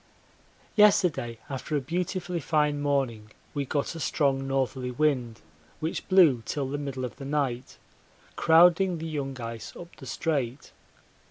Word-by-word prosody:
Yesterday 180 - +4
after 140 +2 -3
a - - +1
beautifully 175 +4 -2
fine 150 -1 +1
morning 130 -7 -1 0.2
we 145 -1 -2
got 140 +2 -1
a 165 - -7
strong 135 -4 0
northerly 130 -1 -1
wind 125 -4 0 0.4
which 160 +1 -3
blew 170 -11 +6
till 140 +2 -2
the 145 +2 -3
middle 135 -3 -4
of 120 - -8
the 140 - -8
night, 135 -3 -2 0.6
crowding 175 +2 +5
the 160 - -6
young 140 -4 -4
ice 115 -1 -7
up 175 0 -11
the 135 - -11
Strait. 135 -2 -2
145 Hz, 145 wpm, -27 LUFS, 130-160 Hz, 0.6 s, blew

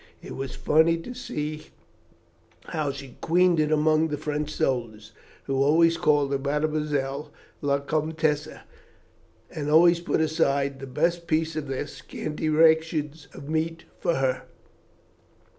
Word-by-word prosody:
It - - -8
was 135 0 -5
funny 160 +2 +3
to 165 +10 -8
see 155 - -5 1.0
how 155 -3 -1
she 135 -2 -10
queened 175 0 +3
it 155 0 +1
among 155 +1 +3
the 150 -2 -3
French 150 0 -3
soldiers, 115 -8 -2 0.3
who 135 -1 -1
always 165 +4 +4
called 145 -4 +2
her 140 - 0
Mademoiselle 150 0 -1 0.3
la 140 -1 +2
Comtesse, 155 0 0 1.0
and 150 -1 -4
always 170 +2 +6
put 175 - -1
aside 140 -3 +1
the 135 - -7
best 170 +6 0
piece 160 0 0
of 155 -2 -3
their 135 +2 -3
scanty 150 +1 -5
ration 160 -1 +3 0.2
of 140 - -9
meat 160 +1 -2 0.2
for 170 -2 +1
her." 130 -1 -1
150 Hz, 135 wpm, -26 LUFS, 140-160 Hz, 1.0 s, always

